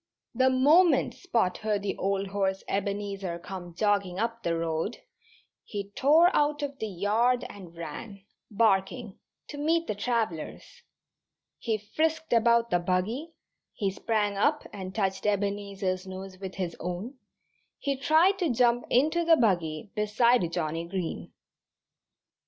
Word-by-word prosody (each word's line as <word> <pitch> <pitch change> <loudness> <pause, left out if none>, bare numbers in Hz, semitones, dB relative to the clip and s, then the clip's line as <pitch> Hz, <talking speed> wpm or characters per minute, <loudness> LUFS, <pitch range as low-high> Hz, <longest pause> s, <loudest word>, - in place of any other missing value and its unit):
The 260 +2 +3
moment 300 +7 +4
Spot 230 - 0
heard 210 -2 -1
the 205 - -2
old 195 +1 0
horse 195 -1 -1
Ebenezer 200 -2 -2
come 175 -1 -8
jogging 200 -2 +1
up 230 +2 -2
the 170 -4 -1
road 165 +6 -2 0.7
he 200 -2 -6
tore 315 - +4
out 295 0 +2
of 280 -1 -5
the 220 - -2
yard 215 +6 +1
and 180 -4 -12
ran, 190 +5 -8 0.3
barking, 210 0 +1 0.3
to 290 - -7
meet 330 +3 +1
the - - -2
travellers. 215 -6 -3 0.8
He 225 -2 -1
frisked 315 +8 -1
about 235 0 +3
the 175 - +3
buggy, 205 - -1 0.4
he 200 -3 -1
sprang 205 0 -1
up 295 +9 +2
and 190 -1 -7
touched 195 -1 -1
Ebenezer's 200 -2 -1
nose 190 0 -8
with 190 -1 -7
his 180 -3 -3
own, 185 - -5 0.6
he 280 -2 -1
tried 320 +8 +3
to 350 -4 +1
jump 240 0 +2
into 310 +7 +3
the 330 -1 +5
buggy 175 - 0
beside 210 -2 +2
Johnnie 165 -1 -2
Green. 180 -2 -4
205 Hz, 135 wpm, -28 LUFS, 190-250 Hz, 0.8 s, the